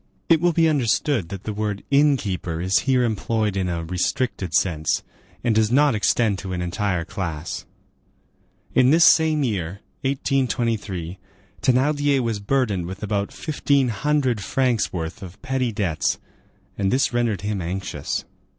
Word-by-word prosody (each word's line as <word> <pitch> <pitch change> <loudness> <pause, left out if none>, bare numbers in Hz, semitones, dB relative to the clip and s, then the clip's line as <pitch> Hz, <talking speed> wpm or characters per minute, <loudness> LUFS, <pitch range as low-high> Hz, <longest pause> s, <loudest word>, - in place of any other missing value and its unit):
It 165 -2 +5
will 175 0 +4
be 165 0 +3
understood 130 - +1
that 100 0 -7
the 110 - -4
word 105 -1 -3
inn 140 0 +5
keeper 90 -6 -3
is 95 +3 +2
here 130 -1 +4
employed 110 -2 0
in 95 -2 -1
a 85 -1 -2
restricted 90 +2 -1
sense, 80 -3 +1 0.4
and 120 -2 +2
does 110 0 +3
not 145 +1 +4
extend 105 -1 +1
to 95 -1 -5
an 90 - -2
entire 90 -1 -1
class. 85 -1 -5 1.1
In 130 0 +5
this 160 +3 +6
same 155 -2 +5
year, 100 -5 -2 0.2
1823, 115 -9 -1 0.4
Thénardier 140 +2 +2
was 115 -4 -1
burdened 100 -5 0
with 95 +3 -7
about 100 -1 -1
fifteen 140 -4 0
hundred 130 0 0
francs' 125 -3 +1
worth 80 -2 -5
of 95 -2 -10
petty 130 -2 0
debts, 95 -7 0 0.6
and 95 -1 +1
this 130 0 +2
rendered 120 -4 0
him 105 -1 -2
anxious. 95 +3 -3
110 Hz, 150 wpm, -23 LUFS, 95-130 Hz, 1.1 s, this